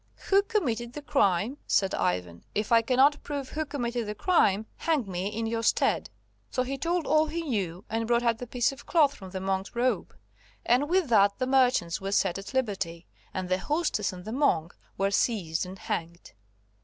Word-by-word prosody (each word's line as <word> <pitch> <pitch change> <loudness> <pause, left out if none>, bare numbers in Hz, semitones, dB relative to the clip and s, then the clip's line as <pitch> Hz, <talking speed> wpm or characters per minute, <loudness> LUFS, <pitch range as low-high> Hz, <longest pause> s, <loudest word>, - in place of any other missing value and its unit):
"Who 395 0 +6
committed 260 - -1
the 295 - -7
crime!" 235 - +1
said 195 -1 +2
Ivan. 90 -1 -1
"If 210 +2 -1
I 230 -1 +6
cannot 265 +5 +3
prove 285 -3 -5
who 315 0 -3
committed 240 -5 -2
the 210 - -4
crime, 215 - +2
hang 310 -7 0
me 185 0 -3
in 220 +2 -3
your 225 0 -1
stead." - - +1 0.4
So 255 - 0
he 265 +2 -3
told 335 +4 -1
all 310 +1 +3
he 335 +2 -3
knew, 195 - -3
and 225 0 -2
brought 240 0 +2
out 230 -2 +1
the 245 - -6
piece 245 +2 +1
of 275 - -12
cloth 300 -5 +4
from 190 -7 -10
the 190 0 -5
monk's 190 +3 -2
robe, 250 +2 0 0.5
and 260 +5 +3
with 365 -2 +2
that 200 -3 +4
the 255 - 0
merchants 255 -11 +2
were 195 0 -3
set 195 -2 +1
at 195 - -8
liberty, 190 -9 -2 0.3
and 185 -1 -4
the 185 +1 +1
hostess 295 - 0
and 180 0 -10
the 220 - -5
monk 175 - +1 0.2
were 195 +1 +1
seized 185 -6 0
and 190 +1 -9
hanged. 170 -1 -5
230 Hz, 195 wpm, -28 LUFS, 190-275 Hz, 0.5 s, Who